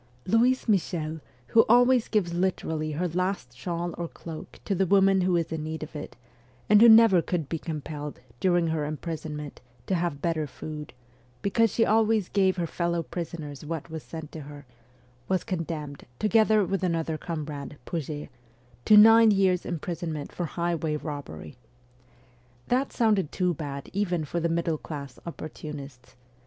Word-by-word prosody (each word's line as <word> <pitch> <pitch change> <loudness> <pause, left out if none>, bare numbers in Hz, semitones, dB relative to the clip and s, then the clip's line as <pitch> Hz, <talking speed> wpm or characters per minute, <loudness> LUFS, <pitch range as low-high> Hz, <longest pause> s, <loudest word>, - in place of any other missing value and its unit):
Louise 245 +6 +3
Michel, 165 -6 0 0.3
who 225 - +6
always 245 0 +5
gives 185 -6 0
literally 160 -4 -1
her 175 +5 -1
last 175 -8 -2
shawl 170 +5 -3
or 170 - -2
cloak 160 -1 -10
to 200 - 0
the 190 0 +1
woman 195 0 +4
who 180 0 +2
is 165 -1 0
in 160 -1 -3
need 160 0 -4
of 155 +1 -10
it, 145 - -7 0.5
and 210 0 +6
who 235 - +9
never 220 -5 +7
could 165 -4 -2
be 165 +2 -3
compelled, 150 -2 -6 0.2
during 175 -2 +3
her 160 -2 -1
im 150 +1 -3
prisonment, 150 -3 -6 0.2
to - - -1
have 170 -5 -1
better 160 -1 -1
food, 150 +1 -8 0.5
because 225 +2 +3
she 225 - +2
always 220 -2 +2
gave 190 -2 +2
her 175 - 0
fellow 170 0 -1
prisoners 155 -4 -6
what 160 0 -5
was 160 -1 -5
sent 160 -1 -8
to 160 - -7
her, 145 0 -11 0.6
was 185 -1 0
condemned, 160 -5 -4
together 215 -1 +4
with 195 +1 -1
another 165 -3 0
comrade, 150 -3 -5
Pouget, 150 -3 -4 0.6
to 210 - +7
nine 225 +1 +8
years' 190 -3 +2
imprisonment 165 -3 -4
for 175 - -3
highway 170 -2 -1
robbery! 145 - -7 1.1
That 260 +3 +1
sounded 210 -8 +2
too 180 -2 +1
bad 140 -3 -6
even 180 -5 0
for 170 +4 -2
the 170 0 0
middle 165 -2 0
class 140 -4 -8
oppor 160 -2 -6
tunists. 140 -5 -9
170 Hz, 160 wpm, -27 LUFS, 155-190 Hz, 1.1 s, who